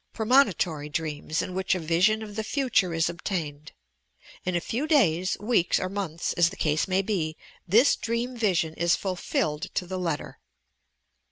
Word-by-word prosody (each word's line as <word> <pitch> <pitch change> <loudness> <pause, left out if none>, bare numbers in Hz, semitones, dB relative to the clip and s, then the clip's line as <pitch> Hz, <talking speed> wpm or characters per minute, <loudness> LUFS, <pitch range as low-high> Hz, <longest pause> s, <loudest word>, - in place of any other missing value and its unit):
Premonitory 205 - +2
dreams 155 0 -2
in 185 - -6
which 190 0 0
a - - -2
vision 180 +7 +2
of 210 -1 -9
the 220 - -2
future 240 -7 +1
is 165 0 +1
obtained. 160 -4 -4 0.7
In 180 -1 -1
a - - +2
few 245 - -3
days, 185 - +3
weeks 205 -4 +2
or 185 - -2
months, 185 -5 -3
as 175 -1 +3
the 195 - -10
case 155 0 0
may 190 +1 +1
be, 165 -7 -2 0.3
this 230 +10 +5
dream 235 +2 -3
vision 185 -8 +1
is 170 +1 +2
fulfilled 165 -5 -2
to 180 - 0
the 185 +1 -4
letter. 165 -5 -3
185 Hz, 165 wpm, -26 LUFS, 165-215 Hz, 0.7 s, this